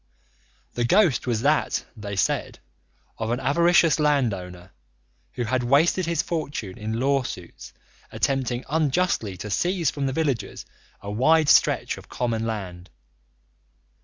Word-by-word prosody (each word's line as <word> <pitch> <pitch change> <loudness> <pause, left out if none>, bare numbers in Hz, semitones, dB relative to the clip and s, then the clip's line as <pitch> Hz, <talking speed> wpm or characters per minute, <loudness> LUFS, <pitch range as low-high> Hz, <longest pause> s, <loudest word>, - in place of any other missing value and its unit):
The 120 - -1
ghost 160 - +3
was 115 -1 -1
that, 150 +2 +1
they 105 -2 -6
said, 95 - -1 0.6
of 110 0 -2
an 120 +2 -1
avaricious 170 +3 +3
landowner 95 -12 -1 0.6
who 120 - -3
had 125 +2 0
wasted 155 +8 +2
his 170 0 0
fortune 145 - -4
in 110 +2 -4
lawsuits, 135 0 -2 0.4
attempting 130 -3 -1
unjustly 150 - 0
to 105 - -6
seize 175 - 0
from 140 -2 -2
the 135 - -2
villagers 135 -10 -2 0.4
a 100 - -6
wide 155 +8 +3
stretch - - +3
of - - -17
common 115 -2 -2
land. 90 -5 -6
130 Hz, 130 wpm, -24 LUFS, 110-155 Hz, 0.6 s, ghost